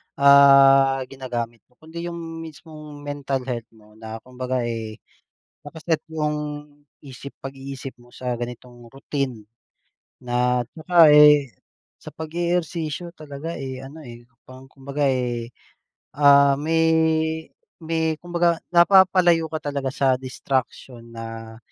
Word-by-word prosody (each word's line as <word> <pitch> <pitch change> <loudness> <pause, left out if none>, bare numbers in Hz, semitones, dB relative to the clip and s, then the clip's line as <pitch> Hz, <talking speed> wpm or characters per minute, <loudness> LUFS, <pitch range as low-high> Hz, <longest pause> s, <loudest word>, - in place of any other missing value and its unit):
ah, 135 -1 +6
ginagamit 120 -3 -5
mo 125 - -34
kundi 170 +3 -8
yung 165 -1 -7
mismong 155 -2 -11
mental 140 -2 -3
health 120 -3 -5
mo 105 -1 -21
na 110 0 -8
kumbaga, 130 0 -3
eh, 115 -2 -5 0.7
naka-set 160 +2 -3
yung 150 -1 -3 0.4
isip, 135 +1 -10
pag-iisip 135 0 -8
mo 120 - -20
sa 125 0 -5
ganitong 120 0 -9
routine 135 -4 -5 0.8
na 125 0 0 0.2
tsaka, 165 0 +5
eh, 150 -3 +6 0.5
sa - - -11
pag-e-ehersisyo, 170 0 -3
talaga, 155 +1 -7
eh, 130 -1 -6
ano, 145 +4 -11
eh, 120 -1 -12 0.2
parang 130 0 -13
kumbaga, 140 +2 -4
eh, 120 -3 -2 0.7
ah, 140 -1 +6
may 160 +3 +1 1.0
may 160 -1 -1
kumbaga 175 -1 +1 0.2
napapalayo 175 -1 +5
ka 155 -2 -3
talaga 140 -2 -3
sa 135 -1 +2
distraction 130 -2 -5
na 115 -1 -8
140 Hz, 115 wpm, -22 LUFS, 125-160 Hz, 1.0 s, ah